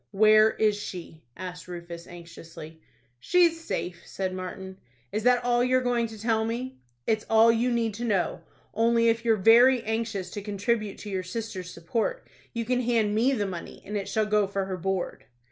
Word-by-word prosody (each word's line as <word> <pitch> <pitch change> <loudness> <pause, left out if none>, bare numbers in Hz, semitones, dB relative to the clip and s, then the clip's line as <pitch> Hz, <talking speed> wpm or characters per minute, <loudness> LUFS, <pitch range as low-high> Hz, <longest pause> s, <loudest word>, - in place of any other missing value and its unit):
"Where 215 +2 +6
is 215 -1 +1
she?" 175 -5 -8 0.2
asked 180 -1 -7
Rufus, 170 -1 -8
anxiously. 165 -2 -11 0.4
"She's 335 - +3
safe," 175 - -4
said 190 -1 -4
Martin. 185 +1 -7 0.3
"Is 215 - -1
that 245 +1 +3
all 240 0 +2
you 255 +1 +3
are - - +1
going 240 -2 +1
to 220 -1 -11
tell 220 0 +1
me?" 240 - -4 0.3
"It's 220 -1 0
all 225 +1 +6
you 235 +2 +1
need 230 -2 0
to 230 +4 -6
know. 200 -6 0 0.3
Only, 230 +1 +3
if 230 0 0
you're 230 -1 +3
very 235 +5 +6
anxious 220 -5 -3
to 205 - -5
contribute 205 +1 -2
to 210 - -7
your 190 -1 -1
sister's 185 -1 -6
support, 230 - -3 0.2
you 230 -1 -3
can 250 +1 +1
hand 230 -4 +1
me 240 +6 +3
the 210 -6 0
money, 180 -3 -7
and 210 - -5
it 200 -2 -3
shall 220 -1 +1
go 210 -1 +2
for 195 0 -2
her 190 -1 -4
board." 185 +1 -3
215 Hz, 190 wpm, -27 LUFS, 190-230 Hz, 0.4 s, Where